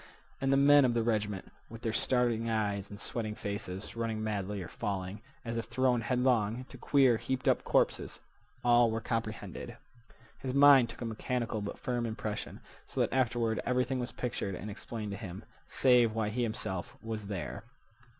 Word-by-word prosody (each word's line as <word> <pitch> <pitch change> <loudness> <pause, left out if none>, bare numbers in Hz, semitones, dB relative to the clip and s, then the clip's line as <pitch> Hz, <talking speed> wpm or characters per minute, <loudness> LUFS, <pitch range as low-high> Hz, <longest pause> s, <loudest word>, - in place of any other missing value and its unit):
And 135 0 +2
the 135 - +5
men 145 +1 +7
of 120 -2 +2
the 115 - +2
regiment, 105 -4 -1 0.2
with 115 0 -10
their 115 - -1
starting 120 -2 +2
eyes 100 -3 -1
and 100 - -9
sweating 110 -3 -3
faces, 100 -1 -5
running 115 -2 -2
madly, 105 -2 -2
or - - -7
falling, 100 0 -4 0.2
as 115 0 -3
if 115 - -2
thrown 125 -2 +2
headlong, 125 -2 +1
to 130 - -10
queer, 130 -3 +4
heaped 130 +2 -3
up - - +3
corpses—all 120 -1 +1
were 110 0 -1
comprehended. 110 -4 -4 0.6
His 130 -1 -3
mind 140 -4 +8
took - - -10
a - - -2
mechanical 115 0 -2
but 100 - -5
firm 120 -2 -2
impression, 110 -1 -5 0.3
so - - -5
that - - +1
afterward 120 -3 +1
everything 125 +1 0
was 125 0 -3
pictured 110 -6 -3
and 105 +3 -6
explained 105 0 -6
to 100 - -4
him, 95 -3 -7 0.2
save 125 -4 +4
why 110 -2 0
he 120 +4 -2
himself 110 -6 -2
was 110 -2 -4
there. 100 -4 -4
115 Hz, 170 wpm, -31 LUFS, 105-125 Hz, 0.6 s, mind